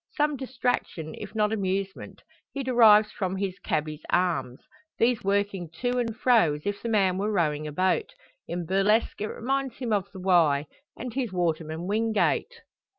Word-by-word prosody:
Some 300 -1 +2
distraction, 245 - -2
if - - -8
not 210 0 +2
amusement, 195 -1 -3 0.3
he 275 - -3
derives 220 -4 +6
from 190 -2 -3
his 190 -1 -3
"cabby's" 155 0 -2
arms; 170 -8 0 0.4
these 235 0 +2
working 200 -3 0
to 245 +7 -1
and 230 -2 -2
fro 230 -12 +4
as 150 - -10
if 205 0 -2
the 235 - -3
man 190 -4 +2
were 210 +2 0
rowing 155 -6 0
a - - -5
boat. 185 - 0 0.3
In 175 0 -4
burlesque 195 +6 +1
it 210 - -1
reminds 270 +2 -2
him 240 -4 -2
of 200 -1 -1
the 190 - -9
Wye, 165 -6 +3 0.3
and 245 -1 -6
his 250 -5 -2
waterman 165 -2 -2
Wingate! 220 - 0
200 Hz, 165 wpm, -26 LUFS, 175-235 Hz, 0.4 s, derives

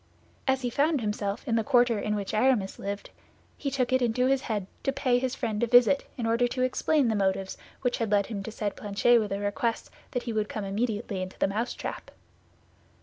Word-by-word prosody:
As 265 0 +2
he 245 - -1
found 295 +3 +2
himself 210 -1 -3
in 230 -1 +2
the 225 - +1
quarter 240 -3 +3
in 210 +1 -1
which 200 0 -4
Aramis 215 -3 +2
lived, 200 +1 -5 0.4
he 280 - -3
took 255 -2 0
it 260 - +3
into 245 +1 +2
his 270 0 +2
head 210 -6 -2 0.2
to 275 - 0
pay 260 -3 +1
his 260 0 -2
friend 215 -1 -2
a 240 - +2
visit 245 +3 +5
in 235 - -2
order 230 +2 +2
to 255 +1 -1
explain 275 +2 +2
the 225 - +2
motives 190 -1 0 0.3
which 245 -1 0
had 225 -2 0
led 200 -1 +3
him 205 -2 -5
to 220 - -6
send 210 -2 -3
Planchet 210 +4 +3
with 210 -3 -2
a 195 - 0
request 225 +3 -2 0.2
that 245 - -3
he 235 - -3
would 215 -1 -1
come 210 -2 -4
instantly 205 -2 -2
to 185 - -16
the - - +3
mousetrap. 220 +5 -4
230 Hz, 215 wpm, -28 LUFS, 205-250 Hz, 0.4 s, visit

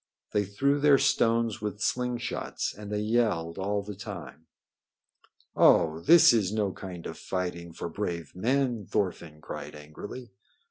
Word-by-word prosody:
They 105 -1 +1
threw 140 +9 +1
their 145 -1 +6
stones 115 -5 +2
with 105 -1 -4
sling 125 +2 0
shots, 120 - -3
and 105 0 -9
they 105 0 -1
yelled 105 -7 0
all 100 +1 -1
the 105 +1 -7
time. 90 - -9 1.1
"Oh, 80 0 +5
this 165 - +7
is 105 -5 +1
no 105 -2 0
kind 90 -3 -8
of - - -7
fighting 90 -2 -4
for 85 - -6
brave 85 -3 -4
men!" 120 0 0
Thorfinn 85 -6 -2
cried - - -7
angrily. 80 +11 -9
105 Hz, 145 wpm, -28 LUFS, 85-115 Hz, 1.1 s, this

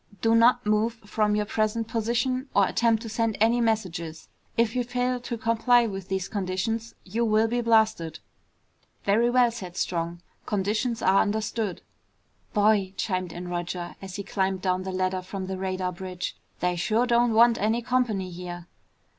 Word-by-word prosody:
Do 225 0 +2
not 240 +1 +5
move 215 +2 +2
from 210 0 +1
your 210 0 0
present 215 +1 -1
position 240 +4 -1
or 200 - +6
attempt 230 -1 +2
to - - -6
send 225 0 0
any 230 +3 +3
messages. 180 -8 -2 0.3
If 230 0 +2
you 250 - +1
fail 250 +1 -1
to 240 -1 -5
comply 230 +2 +3
with 195 -4 -5
these 190 -1 -1
conditions 205 +4 -2
you 220 +5 -2
will 220 0 +3
be 240 +2 0
blasted!" 220 -9 +2 0.9
"Very 225 +4 +3
well," 245 -1 +4
said 185 -6 -8
Strong, 170 0 -2 0.2
"conditions 215 +4 -1
are 190 +1 +5
understood." 215 -1 -2 0.7
"Boy," 205 -3 +2
chimed 185 -4 -2
in 175 +1 -7
Roger, 175 0 -4
as 190 -1 -8
he 200 - -4
climbed 190 -1 -1
down 185 -1 +1
the 190 0 -4
ladder 185 0 -1
from 190 +1 -6
the 190 0 -4
radar 185 -1 -2
bridge, 180 0 -5 0.3
"they 180 0 +1
sure 215 +8 +1
don't 240 -1 +3
want 235 +1 +6
any 225 +3 +1
company 230 -7 0
here." 175 0 -7
210 Hz, 165 wpm, -26 LUFS, 185-230 Hz, 0.9 s, or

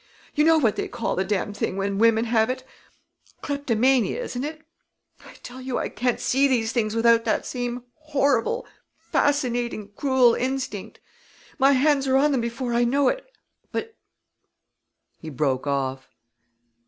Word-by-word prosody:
You 300 - +2
know 325 +1 +5
what 235 -9 +2
they - - -2
call 240 -1 -3
the 190 - 0
damned 205 +1 -2
thing 190 - -2
when 195 0 -1
women 225 0 +4
have 225 0 +2
it 255 0 -3 0.8
kleptomania, 265 - +1
isn't 260 - -4
it? 310 +1 -6 0.6
I - - -14
tell 255 +1 -9
you 255 -1 -3
I - - -2
can't 245 +2 -1
see 275 +2 +2
these 230 -4 +1
things 215 -3 -1
without 230 0 +4
that 220 - 0
same 245 -1 -4 0.2
horrible, 285 - 0 0.3
fascinating, 245 -7 -1
cruel 260 -4 +4
instinct! 255 -6 -3 0.6
My 275 +1 +5
hands 275 0 +2
are 265 0 +3
on 295 +2 +3
them 265 -4 +1
before 235 +1 -3
I 240 +1 +3
know 270 +3 +3
it. - - -5 0.4
But 450 0 -4 0.6
" - - -53
he 160 - -7
broke 135 -1 -1
off. 135 -1 -2
245 Hz, 155 wpm, -24 LUFS, 225-275 Hz, 0.8 s, know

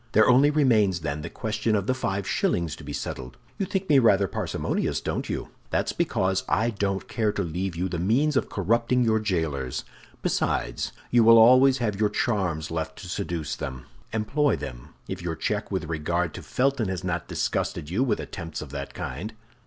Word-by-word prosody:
There 110 - +6
only 130 +3 +6
remains, 110 - +3
then, 75 -1 -3
the - - -5
question 110 0 -1
of 100 -2 0
the 130 - +2
five 100 -6 -2
shillings 85 -3 0
to - - -11
be - - -7
settled. 65 -1 -5 0.2
You 195 - 0
think 195 0 -2
me 145 -3 +6
rather 100 -5 +4
parsimonious, - - -1
don't - - -3
you? - - -3 0.2
That's - - 0
because 95 0 0
I 115 +3 +2
don't 100 -2 -2
care 110 -2 0
to 100 - -1
leave 90 +2 -3
you 90 +3 -1
the 85 -2 -3
means 130 - +2
of 140 - +1
corrupting 115 +5 +1
your 110 -1 +3
jailers. 80 - -2 0.4
Besides, - - 0 0.2
you 120 -1 +5
will 115 +1 +8
always 130 +4 +7
have 105 -5 -1
your 105 -1 +3
charms 90 -11 -1
left 80 -1 -3
to 90 - -8
seduce 85 -5 -3
them 65 - -5 0.3
with. - - -8
Employ 140 +7 +2
them, - - -8
if 95 -1 -5
your 85 -1 -3
check 105 +5 -2
with 95 -4 -2
regard 80 +2 -1
to - - -7
Felton 135 -4 0
has 95 0 -3
not 90 -2 -2
disgusted 75 - -2
you 110 +8 +2
with 130 - 0
attempts 85 -3 -6
of 70 - -11
that 70 -1 -6
kind." 95 - -5
100 Hz, 195 wpm, -26 LUFS, 85-115 Hz, 0.4 s, will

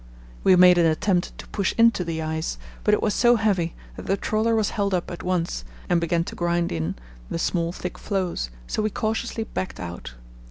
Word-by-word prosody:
We 190 - +6
made 180 0 +7
an 170 - +5
attempt 175 +3 0
to - - -10
push 200 -2 -1
into 230 -5 +5
the 165 -2 -3
ice, 160 +1 -2 0.3
but 210 - +4
it - - -3
was 210 - +2
so 240 0 +5
heavy 195 -7 +1 0.2
that - - -9
the 195 - +2
trawler 220 +3 +1
was 215 -2 +1
held 200 -2 0
up 175 - -3
at 175 - -6
once 175 - -1 0.3
and 175 -1 +3
began 170 0 +1
to - - -7
grind 170 0 0
in 80 +1 -2 0.3
the - - -2
small 170 0 0
thick 180 0 -6
floes, 185 - -2 0.2
so 215 - -2
we 215 - +1
cautiously 225 +2 -2
backed 190 -3 -5
out. 85 -8 -7
180 Hz, 205 wpm, -24 LUFS, 170-210 Hz, 0.3 s, made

